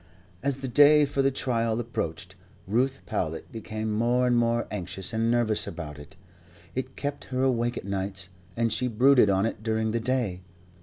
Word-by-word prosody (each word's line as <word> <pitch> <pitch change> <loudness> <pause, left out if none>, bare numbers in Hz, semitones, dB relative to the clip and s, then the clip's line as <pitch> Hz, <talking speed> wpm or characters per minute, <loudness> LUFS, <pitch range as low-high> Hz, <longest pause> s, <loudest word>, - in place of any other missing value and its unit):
As 140 -1 -1
the 135 - -2
day 145 +3 +6
for 140 -1 0
the 135 - +4
trial 115 -4 0
approached, 95 -9 -4 0.3
Ruth 130 +7 0
Powlett 80 +1 -3
became 110 0 -4
more 120 +3 +2
and 125 -1 +3
more 120 0 +2
anxious 95 +1 -4
and 115 +1 +1
nervous 110 -3 +2
about 75 -4 -7
it. 90 +6 -13 0.6
It 130 0 -4
kept 145 0 -4
her 130 0 -1
awake 120 -2 +1
at - - -6
nights, 95 -1 -3 0.3
and 115 -1 +1
she 125 - 0
brooded 125 -1 +5
on 95 +1 +2
it 115 - -3
during 110 0 0
the 115 - 0
day. 115 -7 -1
115 Hz, 175 wpm, -27 LUFS, 105-130 Hz, 0.6 s, day